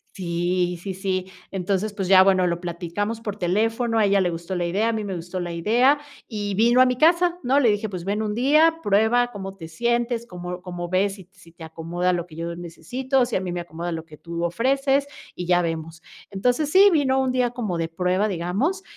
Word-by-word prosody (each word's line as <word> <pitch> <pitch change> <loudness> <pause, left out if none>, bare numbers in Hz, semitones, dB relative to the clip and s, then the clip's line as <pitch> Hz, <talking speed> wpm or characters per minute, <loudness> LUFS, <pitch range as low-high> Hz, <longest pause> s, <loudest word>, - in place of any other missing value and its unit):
Sí, 175 0 -1
sí, 195 - -4
sí. 190 -1 -3 0.2
Entonces, 195 +2 -1
pues 195 -3 -3
ya, 190 -1 +8
bueno, 190 -1 +4
lo 170 -1 -1
platicamos 180 +6 -4
por 210 -2 -5
teléfono, 225 +5 0
a 220 - +4
ella 200 -1 +3
le 180 - +2
gustó 170 +2 -5
la 175 - -1
idea, 200 +6 +1
a - - +2
mí 215 -2 -3
me 195 - -4
gustó 175 +2 -5
la 175 -1 -4
idea, 240 - +3 0.3
y 205 -3 -3
vino 235 +4 +4
a 255 - +7
mi 250 -1 0
casa, 345 +3 +3
¿no? 270 +3 +3
Le 235 - +4
dije, 205 +1 -1
pues, 185 -4 -6
ven 200 +3 -1
un 210 -1 -2
día, 310 +6 +4
prueba 220 +4 +3
cómo 195 -2 -7
te 165 -3 -10
sientes, 235 +5 -1
cómo 180 0 -7
cómo 175 -1 -6
ves, 195 +2 +1
si 190 -3 -15
si 185 -4 -19
te 165 - -12
acomoda 170 +3 -2
lo 175 -1 -2
que 155 - -14
yo 170 +1 -4
necesito, 245 - -1
si 245 - -1
a 185 - -3
mí 180 -2 -4
me 175 - -3
acomoda 170 +1 -5
lo 160 -1 -5
que 155 -2 -15
tú 170 +1 -5
ofreces, 270 +9 +1 0.3
y 180 - -6
ya 175 0 +3
vemos. 165 0 -4 0.3
Entonces, 245 +9 0
sí, 390 +4 +7
vino 265 -4 +2
un 260 -1 0
día 250 -1 +1
como 220 -8 -3
de 165 - -1
prueba, 180 +4 0
digamos, 205 - -1
195 Hz, 225 wpm, -23 LUFS, 175-240 Hz, 0.3 s, ya